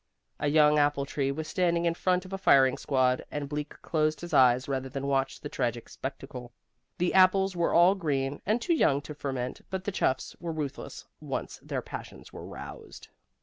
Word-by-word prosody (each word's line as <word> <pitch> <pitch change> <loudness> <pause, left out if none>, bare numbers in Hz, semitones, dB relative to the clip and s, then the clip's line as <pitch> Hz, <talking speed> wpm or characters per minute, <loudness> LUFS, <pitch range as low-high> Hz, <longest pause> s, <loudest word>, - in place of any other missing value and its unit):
A - - 0
young 150 0 +5
apple 145 -1 +2
tree 140 -1 -1
was 155 +2 -4
standing 175 -3 +1
in 170 - +2
front 180 +1 0
of 185 - -9
a - - -1
firing 135 -8 +5
squad, 130 -2 +1
and 145 -1 -4
Bleak 150 +1 -5
closed 155 -1 0
his 175 -1 -7
eyes 125 -2 +5
rather 135 -1 -2
than 135 +1 -4
watch 135 -1 0
the - - -5
tragic 120 -4 -2
spectacle. 130 -2 -7 0.5
The 175 0 0
apples 190 0 +4
were 170 -1 +1
all 175 +3 +7
green, 145 -7 -2
and 215 +4 +1
too 290 +8 +1
young 140 - +3
to 150 - -8
ferment, 130 -4 -4
but 190 -1 -3
the 205 - -2
chuffs 130 -8 -1
were 170 -1 -4
ruthless 150 -4 -5
once - - -5
their - - -4
passions - - -9
were - - -8
roused. - - -10
145 Hz, 190 wpm, -28 LUFS, 135-175 Hz, 0.5 s, all